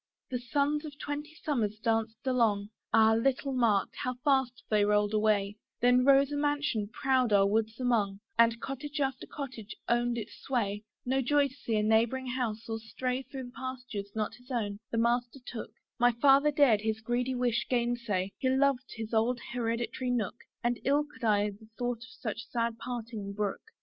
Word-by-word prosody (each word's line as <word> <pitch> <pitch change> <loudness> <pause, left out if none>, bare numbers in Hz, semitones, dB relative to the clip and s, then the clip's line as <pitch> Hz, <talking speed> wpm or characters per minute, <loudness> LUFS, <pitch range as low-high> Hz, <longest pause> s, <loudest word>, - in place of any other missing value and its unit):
The 250 - -1
suns 285 +4 0
of 295 -2 -8
twenty 295 +2 -5
summers 225 -10 -1
danced 225 +2 -1
along, 220 -5 +2 0.2
Ah! 220 0 +6
little 270 +4 +1
marked, 230 -6 +2
how 255 0 -2
fast 265 -4 +2
they 210 -1 +3
rolled 210 0 +2
away: 210 -1 +2 0.2
Then 245 +1 +5
rose 275 +1 +5
a 290 - -1
mansion 290 -7 0
proud 260 -3 +2
our 200 -1 +5
woods 220 +3 0
among, 215 -6 +1 0.2
And 230 0 +4
cottage 285 +4 -5
after 270 -2 -1
cottage 250 -7 -7
owned 240 0 +1
its 220 - -5
sway, 210 -5 -1 0.2
No 265 +2 +1
joy 285 +2 +3
to - - -16
see 235 -4 -3
a 210 - +2
neighbouring 225 +4 +2
house, 230 -3 -2
or 225 0 -3
stray 250 +3 -3
Through 260 -2 -8
pastures 250 -6 -6
not 215 -1 -1
his 245 +2 -17
own, 210 -5 -2
the 230 - -2
master 240 +2 +1
took; 235 - -6 0.3
My 245 0 +5
Father 275 +4 +5
dared 280 -8 +4
his 220 0 -1
greedy 245 +3 -1
wish 245 -2 0
gainsay; 235 -6 0
He 260 - +1
loved 265 -1 +2
his 225 0 -6
old 235 +2 +2
hereditary 240 +1 -2
nook, 235 -4 -1 0.3
And 240 0 +1
ill 285 +3 +3
could 275 -4 -16
I 210 -2 +3
the 215 +2 -15
thought 245 -1 -1
of 250 +2 -11
such 225 0 -4
sad 230 -1 -1
parting 225 -5 -5
brook. 205 -1 -2
240 Hz, 180 wpm, -30 LUFS, 220-260 Hz, 0.3 s, Ah